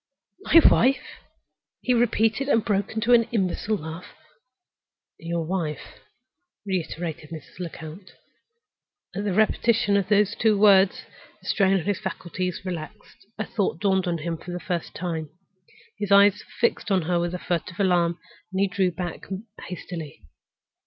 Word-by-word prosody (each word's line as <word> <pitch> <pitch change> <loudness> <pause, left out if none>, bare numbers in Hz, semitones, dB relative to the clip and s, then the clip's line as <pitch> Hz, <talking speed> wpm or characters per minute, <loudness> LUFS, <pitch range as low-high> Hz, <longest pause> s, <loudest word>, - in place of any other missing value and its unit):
"My 335 - +6
wife?" 265 +3 +2 0.6
he 250 - +2
repeated, 230 +2 +2
and 230 -5 +3
burst 200 -2 0
into 225 +2 +1
an 230 -1 +6
imbecile 210 0 0
laugh. 160 +1 -9 1.0
"Your 165 0 -3
wife," 160 -4 -4 0.7
reiterated 170 -4 -4
Mrs. 160 +1 -10
Lecount. 170 +1 -8 1.0
At 205 +2 -3
the 205 - 0
repetition 215 0 +2
of 195 -2 -1
those 210 0 +3
two 220 -2 +2
words 195 -2 +5 0.3
the - - -22
strain 195 -2 +3
on 190 - +1
his 200 +2 -1
faculties 185 -2 -4
relaxed. 185 +3 -8
A 220 - -2
thought 195 -6 -1
dawned 190 -2 +1
on 170 -1 0
him 165 +1 -3
for 175 - -12
the 175 0 -4
first 175 -1 -4
time. 165 -4 -3 0.7
His 205 -1 -3
eyes 200 +1 +6 0.2
fixed 235 -2 +1
on 190 -3 +2
her 175 +1 +1
with 175 +1 -2
a - - -2
furtive 180 +1 -3
alarm, 175 -3 +2 0.3
and 190 - -2
he 200 - +3
drew 190 -1 +1
back 175 0 -6 0.4
hastily. 165 - -7
185 Hz, 145 wpm, -25 LUFS, 170-205 Hz, 1.0 s, My